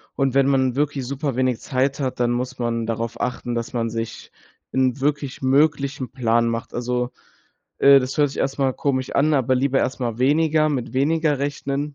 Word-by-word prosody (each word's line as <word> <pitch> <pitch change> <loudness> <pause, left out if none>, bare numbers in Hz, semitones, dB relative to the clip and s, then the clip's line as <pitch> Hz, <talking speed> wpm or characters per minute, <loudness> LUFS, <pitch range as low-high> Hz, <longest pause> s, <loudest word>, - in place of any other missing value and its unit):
Und 135 -2 +1
wenn 135 0 +4
man 130 -2 +2
wirklich 145 -2 -1
super 140 0 -3
wenig 130 -2 +1
Zeit 135 +1 -1
hat, 130 -2 -3
dann 120 0 +2
muss 125 +2 -3
man 115 -2 -2
darauf 115 +1 -3
achten, 125 -1 -3
dass 115 +1 -4
man 115 -2 -1
sich 115 0 -6 0.4
'n 130 0 +1
wirklich 140 -2 -2
möglichen 140 -2 +1
Plan 115 -2 +1
macht. 115 0 -4
Also, 125 0 -2 0.7
äh, 140 0 +7
das 130 +3 -4
hört 145 -2 +3
sich - - -9
erst 135 +1 -1
mal 135 -1 +2
komisch 130 -2 -1
an, 155 +2 +3
aber 130 -2 +2
lieber 135 +1 +1
erst 130 - -1
mal 120 -2 -2
weniger 155 +3 +3
mit 130 -4 -3
weniger 150 +2 +1
rechnen, 140 +1 -3
130 Hz, 190 wpm, -22 LUFS, 125-140 Hz, 0.7 s, äh